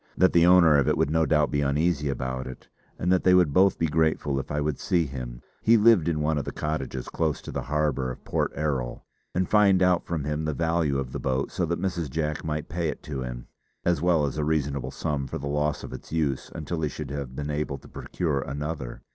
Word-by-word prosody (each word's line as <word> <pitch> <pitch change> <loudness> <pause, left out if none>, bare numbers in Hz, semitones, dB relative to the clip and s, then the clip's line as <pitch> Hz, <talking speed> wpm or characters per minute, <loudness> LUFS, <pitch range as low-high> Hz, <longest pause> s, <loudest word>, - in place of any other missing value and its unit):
That 95 - +4
the 85 0 +5
owner 85 -5 +7
of 70 - +1
it - - +2
would 70 - +1
no 80 0 +2
doubt 75 -2 +2
be 70 - +1
uneasy 75 +1 +1
about 65 -1 -3
it, 65 - -10 0.3
and 90 - 0
that 95 - +3
they 90 0 +6
would 90 -6 +4
both 95 +3 +4
be 80 - +1
grateful 80 -3 +1
if - - -6
I 75 - -1
would 75 -1 -1
see 85 -2 +1
him 60 -3 -7 0.2
he 115 +1 +5
lived 110 -6 +5
in 80 -3 0
one 75 0 +1
of 70 - -4
the - - -4
cottages 65 -4 -3
close 80 -3 -1
to - - -7
the - - -3
harbour 75 -3 0
of 65 - -8
Port - - 0
Erroll 70 -5 -2 0.3
and 90 0 +1
find 100 -3 +4
out 90 -1 +3
from 85 -4 -2
him 75 +1 -2
the 75 -2 -1
value 80 -2 +1
of 65 -2 -3
the - - -4
boat 65 +1 -1
so 85 - -1
that 85 +1 -1
Mrs. 85 -4 -2
Jack 75 +1 -2
might 75 -1 -3
pay 85 -2 -2
it - - -6
to 70 -3 -5
him, - - -6 0.4
as 85 -4 +2
well 85 -4 +3
as 70 +1 -3
a - - +1
reasonable 70 -4 -1
sum 70 0 -3
for - - -4
the 70 - -6
loss 75 +1 -1
of - - -7
its - - -10
use 75 -5 -1
until 80 +1 -4
he 75 - 0
should 75 -2 -6
have 70 -3 -5
been 75 +1 -3
able 75 -1 -2
to - - -16
procure 75 -6 -2
another. 70 -1 -5
75 Hz, 245 wpm, -26 LUFS, 70-85 Hz, 0.4 s, owner